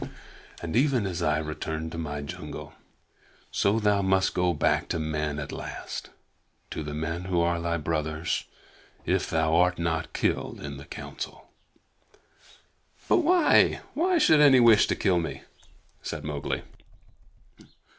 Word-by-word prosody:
"And 80 - -4
even 130 -3 +3
as 90 -3 -3
I 75 0 +2
returned 80 +1 -4
to 80 - -6
my 75 -2 -4
jungle, 80 +1 -8 0.8
so 105 +3 +2
thou 105 -2 +2
must 95 0 +2
go 90 -1 +2
back 75 - +1
to - - -1
men 75 -2 -2
at 75 -2 -5
last - - -6 0.6
to - - -4
the 75 -1 -5
men 85 +3 -3
who 90 -2 0
are 85 0 +1
thy 85 0 -1
brothers 80 0 -2 0.6
if - - 0
thou 80 0 +1
art 90 +1 +3
not 80 -1 -2
killed - - -1
in 70 -1 -6
the 70 - -10
Council." - - -8 1.6
"But - - +4
why 350 0 +5
but - - -8
why 355 +3 +2
should 155 - +5
any 140 -3 +7
wish 115 -3 +6
to - - 0
kill 95 -4 +2
me?" 80 -3 -5 0.6
said 75 -2 -5
Mowgli. 75 -1 -3
85 Hz, 145 wpm, -27 LUFS, 75-95 Hz, 1.6 s, any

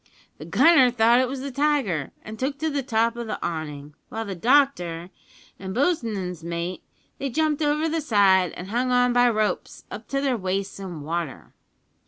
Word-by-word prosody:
The - - -8
gunner 320 -7 +5
thought 235 0 +4
it 260 - +2
was 265 +1 -5
the 275 +1 -5
tiger, 260 - 0
and 215 0 -9
took 275 +2 -2
to 315 +1 -2
the 285 -1 -1
top 230 -2 +1
of 235 -1 -5
the 215 - -3
awning; 150 -3 -5 0.2
while 225 0 -4
the 200 - -4
doctor 185 - +1 0.5
and 190 0 -6
bo's'n's 220 - -1
mate 170 +2 -4 0.4
they 275 - -2
jumped 310 +3 0
over 300 +1 +1
the 325 0 -1
side, 195 - +3
and 185 +3 -8
hung 250 +2 0
on 250 0 +3
by 245 0 +5
ropes 215 -2 -2
up 215 +1 -8
to 275 - -1
their 270 -3 0
waists 195 0 -3
in 180 -6 -7
water! 165 -1 -5
225 Hz, 185 wpm, -24 LUFS, 185-275 Hz, 0.5 s, gunner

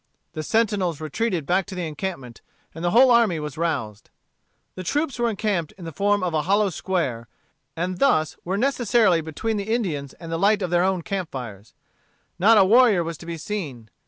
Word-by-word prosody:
The 155 - -4
sentinels 195 -4 0
retreated 170 +2 -2
back 180 +4 +1
to 190 - -7
the 180 -2 -3
encampment, 150 -6 -6 0.3
and 165 - -8
the 175 - +2
whole 250 +6 +6
army 230 -9 +4
was 150 -2 -6
roused. 135 -11 -3 0.6
The 185 - -7
troops 280 - -2
were 240 0 +2
encamped 200 -7 -2
in 180 - -10
the 165 - -6
form 205 +4 +1
of 175 -2 -1
a 155 - +1
hollow 200 +3 +2
square, 145 -12 -2 0.5
and 180 +2 -3
thus 155 - +2
were 185 +3 -2
necessarily 235 -7 +2
between 185 +8 -3
the 200 +2 -3
Indians 160 - -2
and 165 -1 -10
the 165 - -2
light 205 +1 +3
of 180 - -3
their 175 0 +3
own 185 -2 0
camp 195 -3 -3
fires. 110 -6 -8 0.6
Not 220 +5 +6
a 195 - +6
warrior 220 -3 +5
was 165 0 -5
to 170 - -11
be 170 -1 -4
seen. 150 - -6
180 Hz, 195 wpm, -23 LUFS, 155-210 Hz, 0.6 s, whole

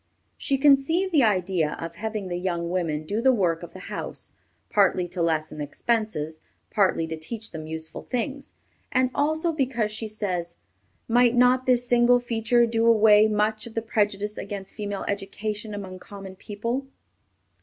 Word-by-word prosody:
She 275 - 0
conceived 295 +7 +4
the 305 -5 +4
idea 185 -7 +1
of 165 0 -5
having 215 +1 -4
the 175 - -3
young 175 -2 -2
women 160 -4 -1
do 210 +7 -1
the 265 +2 +5
work 175 -8 +1
of 175 - -10
the 185 - -10
house, - - -6 0.4
partly 185 -3 +3
to 180 0 -3
lessen 155 -2 0
expenses, 160 -1 -2 0.3
partly 190 -5 +2
to 160 0 -4
teach 220 +8 -5
them 155 -1 -7
useful 160 0 -4
things, 270 +3 -4 0.4
and 255 0 +2
also 315 +3 +1
because 255 -8 -1
she 220 +1 -3
says, 180 -5 -3 0.5
"Might 245 +1 +4
not 250 +1 +4
this 245 -1 +3
single 245 0 +5
feature 235 0 +2
do 230 0 +1
away 215 -1 +6
much 215 +1 0
of 225 - -12
the 225 - 0
prejudice 210 -2 -1
against 200 -1 -6
female 205 -2 -4
education 210 +2 -3
among 190 -2 -7
common 195 -1 -10
people?" 230 +8 -4
210 Hz, 160 wpm, -25 LUFS, 185-240 Hz, 0.5 s, away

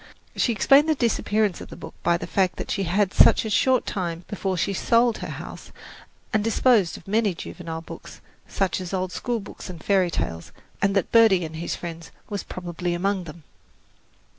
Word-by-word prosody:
She 240 - +2
explained 275 +8 +5
the 310 - +3
disappearance 215 -5 0
of - - -9
the - - -9
book - - -10
by 170 0 +2
the - - -6
fact 190 -2 +1
that - - -5
she 195 0 -1
had 190 +3 +1
a 220 - +3
short 255 +4 +3
time 175 -2 -3
before 190 -2 -2
sold 230 +6 +2
her - - -5
house - - -8 0.6
and 215 -1 +2
disposed 225 -4 +3
of - - -16
many 210 -2 +1
juvenile 165 -1 -7
books, - - -11 0.3
such 190 -1 -1
as 185 +1 -4
old 185 -1 -2
schoolbooks 225 -3 -5
and 170 -3 -9
fairy 190 -3 +3
tales, 80 - -4 0.3
and 200 0 +2
that 195 - 0
"Birdie 220 -7 +5
and 160 0 -7
His 170 - -3
Friends" 165 -1 -8 0.2
was 200 -2 -2
probably 175 -1 -4
among 190 +1 -1
them. 160 0 -11
190 Hz, 180 wpm, -24 LUFS, 175-215 Hz, 0.6 s, explained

